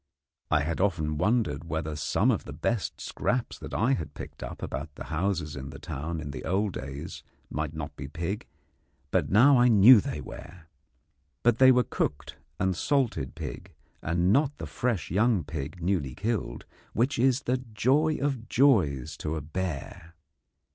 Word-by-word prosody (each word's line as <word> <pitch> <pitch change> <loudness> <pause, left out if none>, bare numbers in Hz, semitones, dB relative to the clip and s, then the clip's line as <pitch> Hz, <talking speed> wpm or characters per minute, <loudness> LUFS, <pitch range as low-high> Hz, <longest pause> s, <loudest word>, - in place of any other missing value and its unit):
I 75 - +3
had 85 +4 -2
often 80 -6 0
wondered 105 - +1
whether 80 -2 -3
some 75 - +2
of - - -2
the - - -7
best 115 -4 -2
scraps 125 -1 -2
that - - -8
I 120 +6 +3
had 75 - -4
picked - - -9
up - - -7
about 70 +3 -5
the - - -7
houses 85 -2 -1
in 70 0 -6
the - - -9
town 80 +4 -5
in 75 -2 -5
the 70 - -7
old 100 +2 0
days 70 +1 -6 0.3
might 75 0 -3
not 75 -1 -6
be 70 - -7
pig, 85 +7 -4 0.7
and - - +2
now 130 +7 +6
I 125 - +6
know 115 +1 +8
that - - -3
they - - -5
were. 85 +1 -10 0.8
But 120 -1 +3
they 130 0 +8
were 125 -1 +4
cooked 70 - -3 0.2
and 95 -1 +1
salted 110 - 0
pig, - - -7 0.3
and 85 +4 +2
not 145 +1 +2
the - - -5
fresh 115 -11 -2
young 105 0 +3
pig 75 +4 -6
newly 85 -9 0
killed, 110 +1 -3 0.3
which 125 +3 +1
is 130 +1 +3
the 125 +1 +1
joy 130 +6 +1
of 135 -5 -2
joys 95 - +3
to 80 +1 -3
a 80 - -3
bear. 85 0 -5
95 Hz, 175 wpm, -28 LUFS, 75-120 Hz, 0.8 s, know